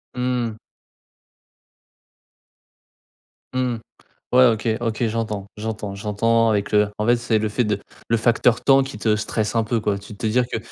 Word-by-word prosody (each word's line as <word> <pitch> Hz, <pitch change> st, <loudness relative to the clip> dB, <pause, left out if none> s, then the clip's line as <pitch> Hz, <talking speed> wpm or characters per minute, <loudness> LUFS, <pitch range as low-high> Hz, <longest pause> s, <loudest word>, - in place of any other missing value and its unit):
Mmh. 125 Hz, -3 st, -1 dB, 3.0 s
Mmh. 125 Hz, -2 st, 0 dB, 0.5 s
Ouais, 130 Hz, +1 st, +7 dB
OK 115 Hz, -2 st, +2 dB
OK 115 Hz, 0 st, -2 dB
j'entends 110 Hz, -3 st, -3 dB
j'entends 105 Hz, -2 st, -4 dB
j'entends 115 Hz, +3 st, +1 dB
avec 100 Hz, -2 st, -1 dB
le 105 Hz, -1 st, +3 dB
en 105 Hz, -, 0 dB
fait, 120 Hz, -, +5 dB
c'est 115 Hz, -2 st, +1 dB
le 110 Hz, 0 st, -1 dB
fait 120 Hz, +4 st, 0 dB
de 105 Hz, -2 st, -1 dB, 0.3 s
le 115 Hz, -, +2 dB
facteur 115 Hz, +1 st, +2 dB
temps 135 Hz, -1 st, +5 dB
qui 130 Hz, -6 st, -8 dB
te 110 Hz, -1 st, +2 dB
stresse 110 Hz, +1 st, -2 dB
un 115 Hz, -, +3 dB
peu, 115 Hz, +1 st, 0 dB
quoi. 105 Hz, -2 st, 0 dB
Tu 100 Hz, +1 st, -11 dB
te 110 Hz, -, -3 dB
dire 125 Hz, +3 st, +2 dB
que, 120 Hz, -, -3 dB
110 Hz, 160 wpm, -22 LUFS, 105-120 Hz, 3.0 s, Ouais